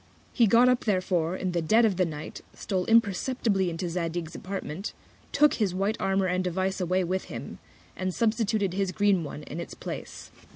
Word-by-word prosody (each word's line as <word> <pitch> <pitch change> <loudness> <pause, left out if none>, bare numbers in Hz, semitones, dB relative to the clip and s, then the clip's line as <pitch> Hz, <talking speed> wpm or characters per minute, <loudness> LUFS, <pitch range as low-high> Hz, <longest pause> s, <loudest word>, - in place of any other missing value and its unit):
He 235 -3 +4
got 235 +5 +6
up 250 -1 +2
therefore 185 -4 +1
in 185 -1 -2
the 175 -1 0
Dead 220 +8 +4
of 210 -4 +2
the 185 -2 +2
Night, 150 -1 -7
stole 185 -3 -2
imperceptibly 220 -2 +2
into 170 +2 -3
Zadig's 170 -1 -3
Apartment, 190 -1 -5 0.4
took 295 +1 +4
his 200 -5 0
white 200 +3 0
Armour 195 0 +1
and 185 0 0
Device 190 +2 -1
away 185 +1 +1
with 185 +2 -2
him, - - -8 0.4
and 185 0 -2
substituted 215 -2 0
his 195 -1 0
green 200 -3 +2
One 150 0 -7
in 155 - -7
its 170 - -7
Place. - - -7
190 Hz, 180 wpm, -27 LUFS, 175-210 Hz, 0.4 s, got